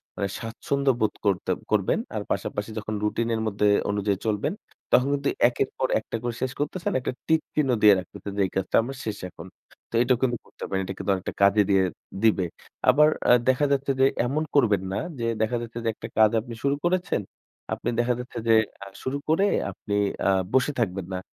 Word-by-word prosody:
মানে 100 - -1
স্বাচ্ছন্দ্য 135 +4 0
বোধ 110 - +1
করতে 100 -3 +1 0.2
করবেন। - - +2 0.2
আর - - -1
পাশাপাশি 105 +1 -2
যখন 110 0 -4
রুটিনের 115 +1 0
মধ্যে 105 0 +1 0.2
অনুযায়ী 100 -1 0
চলবেন, 110 - 0 0.4
তখন 125 - +5
কিন্তু 140 0 0 0.2
একের 125 +2 -1
পর 130 - +1
একটা 110 - -7
করে 120 -1 -2
শেষ 130 - 0
করতেছেন, 150 +5 -2
একটা 125 - -2 0.2
টিক 160 -1 +3
চিহ্ন 150 -3 +2
দিয়ে 105 -1 +8
রাখতেছেন 95 +2 -8
যে - - +2
এই 95 - -5
কাজটা 95 - -1
আমার 135 +3 -6
শেষ 105 -2 -3
এখন। 85 0 -11 0.4
তো - - -23
এইটাও 125 0 +3
কিন্তু 120 -3 +1
করতে - - -12
পারেন। 95 0 -1
এটা 95 - -4
কিন্তু 100 - -1
অনেকটা 95 - -5
কাজে 100 +1 +6
দিয়ে 95 -1 +4 0.4
দিবে। 100 -5 +4 0.4
আবার 150 +1 +6 0.2
আ - - +8 0.2
দেখা 130 +3 +3
যাচ্ছে 140 0 +1
যে 135 - +6 0.2
এমন 150 +5 0
করবেন 105 -9 +4
না - - -1 0.2
যে 115 - -1 0.2
দেখা 110 +2 +1
যাচ্ছে 115 0 -6
যে - - +2
একটা 115 - -7
কাজ 110 -1 +7
আপনি 120 +1 -9
শুরু 140 0 +2
করেছেন। 185 - +1 0.5
আপনি - - -3
দেখা 120 +1 +2
যাচ্ছে 125 0 -8
যে 115 - +6 0.3
আ - - -9 0.2
শুরু 130 +2 -1
করে 165 +6 +4 0.3
আপনি 100 - -4 0.3
আ - - +5 0.2
বসে 130 +2 +3
থাকবেন 95 -5 -1
না, 90 - -2
115 Hz, 200 wpm, -25 LUFS, 105-135 Hz, 0.5 s, দিয়ে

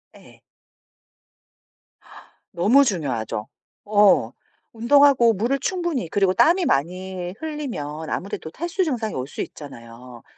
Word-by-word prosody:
예. - - -18 2.1
너무 220 +11 +4
중요하죠. 125 - -3 0.4
어. 205 -1 +4 0.4
운동하고 240 0 +4
물을 235 +8 -1
충분히 345 - -2
그리고 195 -1 +1
땀이 350 - +3
많이 180 - -2
흘리면 230 - -6
아무래도 180 -4 -5
탈수 345 - -2
증상이 235 -9 -2
올 130 0 -4
수 - - -6
있잖아요. 120 -3 -11
200 Hz, 245 characters per minute, -22 LUFS, -, 2.1 s, 너무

